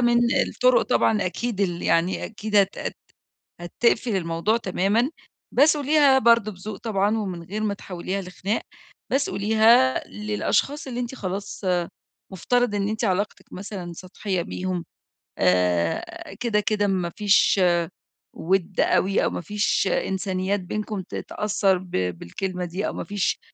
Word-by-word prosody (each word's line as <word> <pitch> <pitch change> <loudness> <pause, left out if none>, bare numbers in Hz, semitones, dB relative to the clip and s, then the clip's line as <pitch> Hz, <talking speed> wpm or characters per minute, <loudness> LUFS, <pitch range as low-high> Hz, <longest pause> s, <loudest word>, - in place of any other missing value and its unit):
من 240 0 +4 0.3
الطُرُق - - +3
طبعًا. 215 -4 +2
أكيد 215 +3 -3
ال 175 -3 -1
يعني 170 +3 +1
أكيد 215 -1 -3
هت 200 -1 +3
هت - - -4 0.6
هتقفل 225 +5 +1
الموضوع 170 +4 0
تمامًا، 215 +4 +1 0.4
بس 295 +4 +5
قوليها 290 -2 +4
برضه 230 -3 +4
بذوق 200 +3 -7
طبعًا، 210 -1 0
ومن 185 -5 -4
غير 205 +6 -5
ما 205 -2 0
تحوليها 190 0 -5
لخناق. 190 +3 -3 0.5
بس 275 +2 +1
قوليها 215 - +4
للأشخاص 105 - -1
اللي 245 -2 -4
أنتِ 245 +1 -4
خلاص 200 -2 -5 0.7
مفترض 245 +4 +1
إن 200 0 0
إنتِ 220 +2 -3
علاقتِك 200 0 -2
مثلًا 185 -2 -6
سطحية 185 +1 -4
بيهم، 180 0 -4 0.5
آآ 90 - 0
كده 230 -3 +1
كده 205 0 0
ما 185 -3 0
فيش 205 -1 +4 0.7
ودّ 185 +1 -1
أوي، 195 +1 +2
أو - - +1
ما - - -4
فيش 205 +2 0
إنسانيات 190 +1 -1
بينكم 210 +2 -4
ت 180 - -12
تأثر 200 -2 0
ب 180 0 -12
بالكلمة 95 - -3
دي، 180 +4 -3
أو - - -2
ما - - -5
فيش 205 -2 -1
200 Hz, 140 wpm, -24 LUFS, 180-220 Hz, 0.7 s, بس